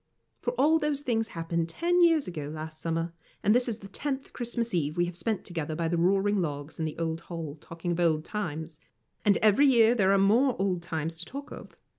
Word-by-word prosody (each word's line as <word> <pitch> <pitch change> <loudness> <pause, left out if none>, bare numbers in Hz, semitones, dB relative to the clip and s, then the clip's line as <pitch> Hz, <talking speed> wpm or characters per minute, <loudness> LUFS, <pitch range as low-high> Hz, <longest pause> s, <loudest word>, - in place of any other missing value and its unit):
For 245 - -2
all 295 +6 +4
those 300 -2 0
things 225 -5 0
happened 165 -2 -2
ten 350 - +1
years 330 -4 +4
ago 155 -5 -5
last 155 0 -7
summer, 165 0 -2 0.3
and 210 - +5
this 245 +1 +2
is 220 - -3
the 200 - -11
tenth 270 +6 -4
Christmas 235 -1 -2
Eve 155 -2 0
we 175 - +3
have 175 0 -6
spent 215 +3 -2
together 160 -3 -4
by 165 +1 -1
the 170 +1 0
roaring 195 +3 +2
logs 145 -2 -4
in 160 - 0
the 155 - -4
old 165 0 -2
hall, 165 -4 -5
talking 165 +1 -5
of 170 - -1
old 160 -2 +2
times; 160 -6 -4 0.4
and 205 -2 +4
every 215 +7 +6
year 235 -3 +6
there 195 -5 +3
are 200 - +5
more 235 +7 +4
old 190 -3 0
times 165 -1 -3
to 175 - -5
talk 280 +2 -8
of. - - -10
180 Hz, 220 wpm, -28 LUFS, 165-235 Hz, 0.4 s, every